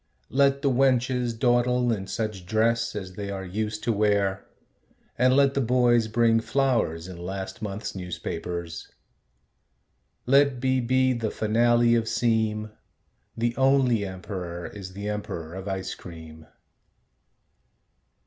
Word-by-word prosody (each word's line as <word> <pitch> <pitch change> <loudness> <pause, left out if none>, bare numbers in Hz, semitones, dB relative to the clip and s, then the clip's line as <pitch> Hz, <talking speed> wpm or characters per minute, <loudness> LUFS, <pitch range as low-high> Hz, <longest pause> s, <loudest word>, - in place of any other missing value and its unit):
Let 140 +1 +3
the 140 - +3
wenches 125 -2 +1
dawdle 120 0 +2
in 95 -3 -4
such 105 -5 -4
dress 115 +2 +1
As 95 -3 -6
they 100 +1 -5
are 95 -1 -5
used 105 +3 -3
to 115 - +1
wear, 100 -2 +1 0.7
and 130 +1 +3
let 140 -1 +4
the 140 - +1
boys 120 -2 +3
Bring 115 +1 +3
flowers 115 - 0
in 90 -2 -9
last 95 +3 -6
month's 105 0 -4
newspapers. 85 -2 -5 1.4
Let 140 0 +4
be 130 +1 +1
be 130 +1 +2
the 115 -3 -2
finale 120 +2 +3
of 115 -1 +1
seem. 110 -2 0 0.7
The 120 +1 0
only 130 -5 +3
emperor 90 -3 -6
is 95 -2 -8
the 100 +2 -6
emperor 85 -6 -5
of 95 +1 -7
ice 95 -1 -3
cream. 80 -2 -11
110 Hz, 130 wpm, -26 LUFS, 95-125 Hz, 1.4 s, let